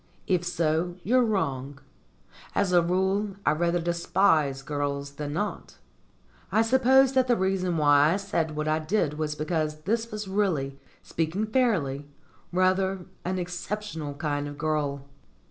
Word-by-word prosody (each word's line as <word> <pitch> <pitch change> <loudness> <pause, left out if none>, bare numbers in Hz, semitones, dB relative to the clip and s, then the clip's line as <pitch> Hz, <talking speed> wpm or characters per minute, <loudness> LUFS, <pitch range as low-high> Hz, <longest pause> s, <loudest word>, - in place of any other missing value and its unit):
If 180 -2 +1
so, 170 0 0
you're 250 +5 +3
wrong. 140 - -1 0.8
As 195 -3 +1
a 175 - +6
rule, 190 +3 0
I - - +4
rather 170 +2 +1
despise 170 -5 +1
girls 140 -1 -3
than 145 0 -5
not. 205 +6 -4 0.7
I 220 - +4
suppose 260 +2 +4
that 260 -1 +3
the 245 - +4
reason 185 -2 0
why 145 +1 +5
I - - +1
said 170 -6 -2
what 150 0 -2
I 155 +1 +2
did 155 -2 -1
was 150 -1 -1
because 155 -1 -2
this 225 +6 -1
was 210 -1 -5
really, 165 -9 -1 0.2
speaking 165 +6 -2
fairly, 185 - 0 0.4
rather 185 0 +1 0.2
an 185 +1 -2
exceptional 180 -3 -4
kind 145 0 -2
of 145 0 -8
girl. 145 -3 -1
170 Hz, 145 wpm, -27 LUFS, 150-195 Hz, 0.8 s, a